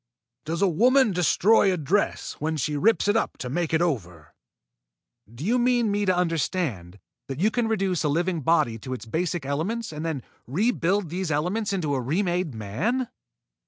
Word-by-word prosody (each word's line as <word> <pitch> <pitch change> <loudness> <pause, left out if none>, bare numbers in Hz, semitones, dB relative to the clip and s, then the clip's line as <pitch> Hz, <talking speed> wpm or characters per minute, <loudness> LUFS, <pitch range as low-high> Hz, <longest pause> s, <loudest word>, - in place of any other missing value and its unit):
Does 165 +4 -1
a - - +5
woman 245 - +4
destroy 190 +4 +4
a 180 - 0
dress 175 +7 0
when 160 +1 -1
she 150 +2 -1
rips 210 +8 +2
it 205 - +3
up 225 - 0
to 125 - -5
make 170 +2 -1
it 160 +1 +2
over?" 90 - -3 1.0
"Do 120 +7 -7
you 240 +5 +2
mean 240 -3 +2
me 205 0 0
to 185 -1 +2
understand 160 - -1 0.3
that 135 +1 -5
you 210 +5 +3
can 240 -1 0
reduce 195 -6 0
a 150 - +1
living 170 +2 0
body 125 -7 +2
to 130 +4 -6
its 120 - -9
basic 165 +4 -2
elements 190 +12 -2
and 150 +1 -5
then 160 -6 -3 0.2
rebuild 195 - +1
these 180 +1 -3
elements 180 +9 -1
into 170 -7 -1
a 135 - 0
remade 175 - -1
man?" 210 - -2
175 Hz, 180 wpm, -25 LUFS, 145-205 Hz, 1.0 s, a